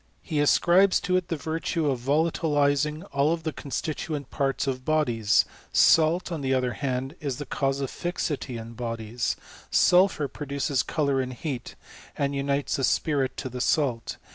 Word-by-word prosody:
He 155 -4 -2
ascribes 175 +6 +4
to 180 - 0
it 185 -1 0
the 165 - -1
virtue 160 +1 -2
of 130 - -2
volatilizing 150 +1 +1
all 145 +4 +2
the 160 -2 -4
constituent 150 0 -4
parts 135 0 0
of 130 -2 -2
iKKiies: 120 -8 +2 0.3
salt, 165 +3 +4
on 165 -3 -3
the 135 -1 +1
other 125 -1 0
hand, 135 0 -3
is 140 -4 -3
the 145 - -5
cause 135 0 -1
of 135 - -3
fixity 155 -7 -3
ia 115 -1 -6
bodies; 115 0 -3 0.3
sulphur 180 -5 +4
produces 140 -2 -1
colour 140 -4 0
and 130 0 -4
heat, 130 -4 -5 0.4
and 140 0 0
^ites 140 0 -1
the 135 - -2
spirit 140 -1 +1
to 135 - -4
the 125 0 -5
salt. 125 -7 0
140 Hz, 160 wpm, -26 LUFS, 130-155 Hz, 0.4 s, ascribes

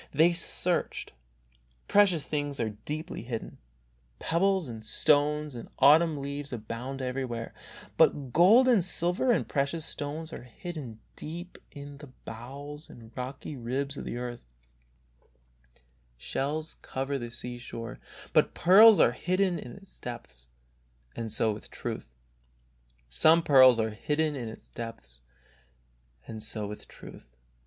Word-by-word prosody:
They 160 +4 +4
searched. 175 - -1 0.7
Precious 190 -7 +4
things 145 -2 -3
are 110 -2 0
deeply 150 +11 -6
hidden. 115 -1 -6 0.6
Pebbles 185 - +1
and 110 -2 -8
stones 150 +5 +2
and 120 -2 -8
autumn 155 +3 +6
leaves 140 0 -5
abound 125 +3 -5
everywhere, 125 -3 -3 0.4
but 135 -4 +3
gold 220 +10 +7
and 230 -8 +5
silver 180 +7 +1
and 235 - +1
precious 145 +3 -1
stones 155 +3 -4
are - - -6
hidden 125 -2 -8 0.2
deep 175 +4 -7
in 145 -1 -10
the 145 - -10 0.2
bowels 140 +6 -8
and 115 -1 -14
rocky 130 +3 -6
ribs 135 +3 -3
of - - -6
the - - -4
earth; 120 -1 -5 1.8
shells 150 - -3
cover 135 +1 -3
the 120 -1 -5
sea 120 +1 -5
shore, 115 -1 -7 0.3
but - - +3
pearls 205 +4 +8
are - - +6
hidden 185 +6 0
in 120 - -8
its 195 -1 -16
depths. 65 - -8 0.7
And 115 -2 -4
so 110 - +1
with 105 - -10
truth. - - -5
140 Hz, 110 wpm, -29 LUFS, 120-165 Hz, 1.8 s, pearls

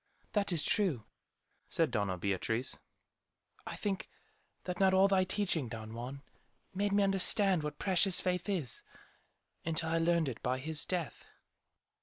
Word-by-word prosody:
"That 205 -2 +1
is 165 -4 +1
true," 170 - +2 0.6
said 165 -5 +1
Doña 100 -5 -1
Beatriz. 100 +6 -2 0.9
"I - - -5
think 195 -2 -3 0.5
that 180 -1 -4
not 190 -1 +4
all 190 +1 +6
thy 190 -1 +3
teaching, 185 - -1
Don 110 -1 -7
Juan, 130 +4 -7 0.5
made 200 +2 0
me 200 0 +3
understand 195 -1 +3
what 150 -1 -5
'precious 190 -1 +2
faith' 180 +2 -1
is, 155 - 0 0.8
until 165 0 -1
I 165 0 +1
learned 165 -1 +2
it 120 -4 -5
by 125 +1 0
his 150 +3 0
death." 175 -5 -3
165 Hz, 145 wpm, -33 LUFS, 130-190 Hz, 0.9 s, all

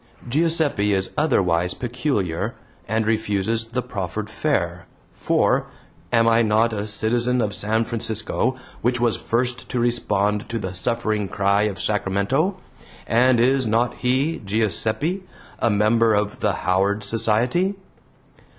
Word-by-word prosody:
Giuseppe 145 -7 +2
is 95 0 -1
otherwise 90 - +1
peculiar, 115 - -2 0.3
and 110 +1 0
refuses 110 0 0
the 125 +2 -3
proffered 100 +2 -5
fare, 90 - -1 0.3
for - - +1 0.4
am 115 -1 +4
I 115 0 +4
not 110 +1 +2
a 105 0 -3
citizen 120 +4 0
of 105 -3 0
San 110 +2 0
Francisco, 115 +2 -1 0.3
which 120 0 +1
was 120 -2 +2
first 120 +1 -2
to 125 - -1
respond 105 -3 0
to 115 - -2
the 95 -4 -4
suffering 110 +1 -1
cry 100 +2 +1
of 100 - -7
Sacramento? 105 - 0 0.5
and 120 +1 +3
is 130 +1 +3
not 115 +3 +1
he, 135 +6 0
Giuseppe, 110 - 0 0.4
a 120 - +2
member 110 +2 +3
of 105 0 -1
the 105 - +1
Howard 100 +3 +1
Society? 115 - +1
110 Hz, 130 wpm, -22 LUFS, 100-120 Hz, 0.5 s, am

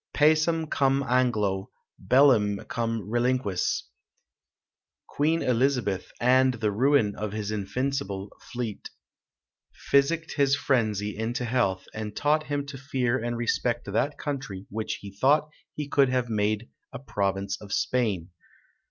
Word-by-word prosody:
Pacem 160 +2 +3
cum 135 -1 +1
Anglo, 110 -7 +1 0.3
bellum 110 -3 +4
cum 115 -3 -2
reliquis. 120 -4 0 1.2
Queen 160 +3 0
Elizabeth, 125 -6 0
and 130 +1 +4
the 110 -2 0
ruin 120 -1 +3
of 105 -1 -4
his 105 -1 -3
invincible 105 -1 -3 0.2
fleet, 120 -4 -5 0.9
physicked 160 +4 +1
his 140 -1 +3
frenzy 110 -7 0
into 120 +4 -2
health, 115 -6 0
and 105 -1 -5
taught 155 +4 +1
him 145 -1 -2
to 135 -2 -8
fear 130 -3 -1
and 120 0 -2
respect 120 0 -1
that 140 +8 0
country 130 -10 -5
which 110 +1 -3
he 100 - -8
thought 145 +9 +3 0.3
he 150 -1 -4
could 140 -2 +3
have 125 -2 0
made 105 +1 0 0.2
a - - -6
province 100 -5 -2
of 100 -1 -10
Spain. 100 -7 0
120 Hz, 125 wpm, -27 LUFS, 105-140 Hz, 1.2 s, bellum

